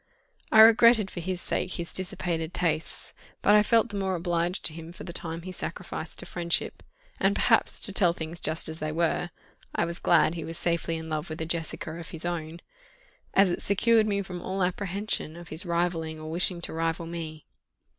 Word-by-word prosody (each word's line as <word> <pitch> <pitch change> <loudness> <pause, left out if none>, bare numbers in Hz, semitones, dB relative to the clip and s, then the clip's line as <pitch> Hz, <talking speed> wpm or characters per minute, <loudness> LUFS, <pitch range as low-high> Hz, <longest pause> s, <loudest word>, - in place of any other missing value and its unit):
I 220 - +8
regretted 225 -2 +7
for - - -6
his 180 +1 -3
sake 185 - -1
his 170 0 -5
dissipated 175 -3 -2
tastes, 160 -2 -1 0.3
but 205 - +5
I 210 - +7
felt 230 +2 +3
the 205 - -7
more 190 -1 0
obliged 175 +1 -1
to 155 - +1
him 165 +1 -9
for 175 - -10
the 170 - -7
time 165 -1 -4
he 185 - -6
sacrificed 175 -2 -5
to - - -5
friendship; 170 -1 -1 0.4
and - - +2
perhaps, - - +3
to - - +7
tell 180 -6 +4
things 165 0 -6
just 155 +1 +2
as 160 0 -4
they 155 0 -2
were, 170 +2 0 0.5
I - - +2
was 170 0 -4
glad 155 - +4
he 165 -2 -5
was 165 +1 -6
safely 170 -1 -1
in 160 0 -7
love 155 +1 -3
with 155 - -6
a 160 - -2
Jessica 160 -1 -3
of 165 - -8
his 165 +1 -4
own, 170 -1 -4 0.7
as 195 -2 +5
it - - -2
secured 220 +2 +3
me 200 -1 0
from 180 -2 -7
all 190 +1 -2
apprehension 190 -2 -2
of 175 -1 -11
his 165 +5 -2
rivalling 170 -2 -1
or 155 0 -7
wishing 175 +1 0
to - - -5
rival 165 +1 -1
me. 160 -2 -7
170 Hz, 205 wpm, -27 LUFS, 165-185 Hz, 0.7 s, I